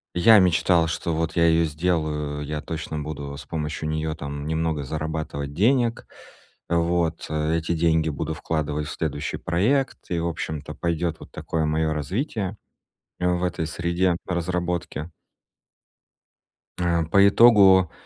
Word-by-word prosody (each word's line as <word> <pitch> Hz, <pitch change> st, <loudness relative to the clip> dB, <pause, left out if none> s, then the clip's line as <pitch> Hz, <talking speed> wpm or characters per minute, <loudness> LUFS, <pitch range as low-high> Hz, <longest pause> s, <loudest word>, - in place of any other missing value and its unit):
Я 110 Hz, +5 st, +7 dB
мечтал, 85 Hz, -1 st, +3 dB
что 85 Hz, +1 st, -2 dB
вот 80 Hz, 0 st, -2 dB
я 85 Hz, -1 st, +4 dB
её 80 Hz, 0 st, +4 dB
сделаю, 75 Hz, -2 st, -1 dB
я 75 Hz, +1 st, -4 dB
точно 80 Hz, 0 st, -5 dB
буду 75 Hz, -2 st, -5 dB
с -, -, -10 dB
помощью 75 Hz, -1 st, -4 dB
неё 80 Hz, 0 st, -2 dB
там 70 Hz, -1 st, -6 dB
немного 80 Hz, -1 st, -1 dB
зарабатывать 75 Hz, -1 st, -4 dB
денег. 115 Hz, -, +2 dB, 0.6 s
Вот, 85 Hz, -1 st, 0 dB
эти 80 Hz, +2 st, 0 dB
деньги 80 Hz, -1 st, +2 dB
буду 75 Hz, +2 st, -3 dB
вкладывать 75 Hz, -1 st, -2 dB
в -, -, -5 dB
следующий 75 Hz, +1 st, -3 dB
проект 115 Hz, +11 st, 0 dB
и, 85 Hz, -, 0 dB
в 85 Hz, -, -1 dB
общем-то, 75 Hz, -2 st, -5 dB
пойдет 85 Hz, -1 st, -2 dB
вот -, -, -13 dB
такое 80 Hz, -1 st, -2 dB
моё 80 Hz, 0 st, 0 dB
развитие 100 Hz, -, -3 dB, 0.6 s
в 90 Hz, 0 st, +1 dB
этой 85 Hz, -3 st, -1 dB
среде 85 Hz, +2 st, 0 dB
разработки. 90 Hz, -2 st, -2 dB, 1.7 s
Э, 85 Hz, -2 st, +1 dB
по 100 Hz, +5 st, +5 dB
итогу, 100 Hz, -5 st, +6 dB
80 Hz, 135 wpm, -24 LUFS, 75-90 Hz, 1.7 s, Я